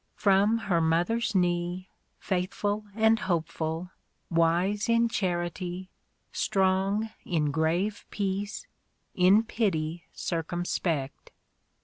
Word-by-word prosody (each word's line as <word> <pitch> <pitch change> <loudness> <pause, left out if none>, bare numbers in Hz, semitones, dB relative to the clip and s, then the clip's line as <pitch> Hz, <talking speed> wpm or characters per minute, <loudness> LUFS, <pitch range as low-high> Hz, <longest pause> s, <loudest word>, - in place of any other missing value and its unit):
From 200 +2 +3
her 190 -7 0
mother's 175 +8 +1
knee 175 0 0 0.3
Faithful 205 +3 -2
and 220 0 +4
hopeful; 165 -1 -2 0.4
wise 175 +6 +2
in 230 0 +4
charity; 180 -1 -2 0.4
Strong 195 +3 +1
in 150 -4 0
grave 170 +7 0
peace; 200 +1 -3 0.5
in 190 +4 +5
pity 170 -8 -1
circumspect. 165 -4 -2
185 Hz, 85 wpm, -28 LUFS, 170-205 Hz, 0.5 s, in